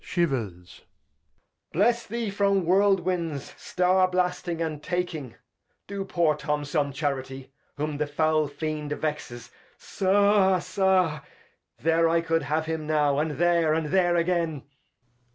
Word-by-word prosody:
{Shivers.} 110 - -3 0.9
Bless 235 +6 +1
thee 230 -1 -3
from 200 -2 +1
Whirl 195 +3 +4
Winds, 170 -6 -3
Star 185 +1 +2
blasting, 180 -2 -1
and 155 -3 -3
Taking: 175 -8 -3 0.5
Do 200 0 -5
poor 170 -4 +2
Tom 150 0 -2
some 145 -1 -1
Charity, 135 -2 -4 0.3
whom 150 0 -3
the 150 0 -1
foul 155 +1 +1
Fiend 150 0 -4
vexes. 150 -6 -5 0.2
— - - -37
Sa, 195 0 +3
sa; 185 -4 +1 0.6
there 165 +1 +2
I 165 0 +2
could 165 0 0
have 155 +3 -1
him 160 -1 -4
now, 145 -2 +2
and 155 0 -1
there, 170 -2 +3
and 160 -2 -2
there 175 -2 +3
agen. 170 -4 0
165 Hz, 135 wpm, -26 LUFS, 150-185 Hz, 0.9 s, Whirl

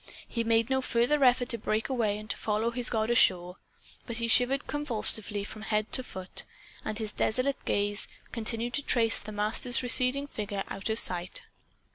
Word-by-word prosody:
He 230 - -2
made 230 +2 +1
no 265 0 +2
further 255 +4 +1
effort 250 0 +4
to 235 - +2
break 215 +1 -1
away 225 -6 0
and 215 0 -9
to - - -1
follow 220 +2 -1
his 245 0 +1
god 220 0 0
ashore. 180 -5 +3 0.5
But 235 -2 -1
he 230 0 0
shivered 250 +4 +2
convulsively 220 -7 0
from 215 +1 -8
head 215 0 -1
to 260 - 0
foot; 190 -6 -3 0.4
and 215 -1 -4
his 215 -2 -2
desolate 255 +4 -1
gaze 205 0 0 0.2
continued 230 +1 -2
to 285 - -1
trace 230 -5 +1
the 215 - -9
Master's 215 +4 +1
receding 255 +3 +5
figure 205 -7 -4
out 195 +3 -4
of 220 - +1
sight. 180 -4 -1
225 Hz, 180 wpm, -29 LUFS, 210-250 Hz, 0.5 s, receding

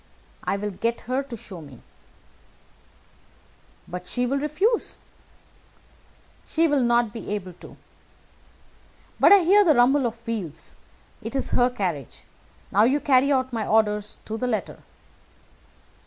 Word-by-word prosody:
"I 200 - -1
will 210 +1 -3
get 230 +5 -2
her 255 +3 -1
to 260 -4 -8
show 185 -5 -10
me." 140 -5 -14 2.0
"But 180 0 -7
she 245 +6 -1
will 275 +3 0
refuse." 365 - 0 1.5
"She 330 +1 +1
will 290 -3 +2
not 235 -2 +2
be 225 - -7
able 185 -3 -6
to. - - -13 1.4
But - - +6
I 400 -2 +8
hear 400 +5 +6
the 315 -6 +4
rumble 255 +2 +4
of 230 0 -9
wheels. 185 -9 -5 0.5
It 230 - -6
is 270 - -1
her 245 0 +3
carriage. 180 - -4 0.5
Now 210 +3 +5
carry 275 -1 +3
out 260 -2 0
my 225 -2 -2
orders 210 -1 +1
to 220 +1 -5
the 250 - -1
letter." 225 -3 -3
235 Hz, 135 wpm, -24 LUFS, 210-275 Hz, 2.0 s, I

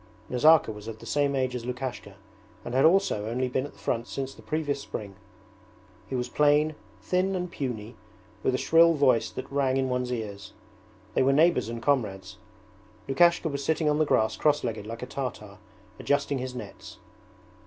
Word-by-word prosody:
Nazarka 155 +1 +5
was 105 0 -10
of 115 -1 -6
the - - -13
same 145 -1 +1
age 130 -1 0
as 120 - -4
Lukashka 125 -5 -5 0.5
and 120 - -5
had 130 +2 +4
also 165 - +3
only 125 +2 -1
been 130 +2 -1
at - - -16
the - - -22
front 115 +1 -2
since 135 0 -4
the - - -15
previous 145 -3 -2
spring. 105 -7 -7 0.9
He 130 - -4
was 125 0 -1
plain, 150 +3 +3 0.3
thin 185 +1 0
and 180 -1 -3
puny, 120 -6 -5 0.5
with 130 - +1
a - - +1
shrill 165 +3 +5
voice 130 -6 +3
that 130 - -8
rang 135 -2 +1
in 130 -1 0
one's 125 0 -1
ears. 105 -4 -5 0.6
They - - +2
were 135 +1 +4
neighbours 160 -5 +3
and 115 0 -6
comrades. 110 -9 -1 0.7
Lukashka 170 +5 +3
was 140 -2 -3
sitting 160 +1 0
on 150 0 +2
the 155 - +3
grass 110 -6 +2
crosslegged 120 -8 0
like 115 +2 -6
a - - -2
Tartar, 105 -7 -6 0.4
adjusting 145 -1 0
his 130 0 -5
nets. - - -9
130 Hz, 180 wpm, -27 LUFS, 115-145 Hz, 0.9 s, Nazarka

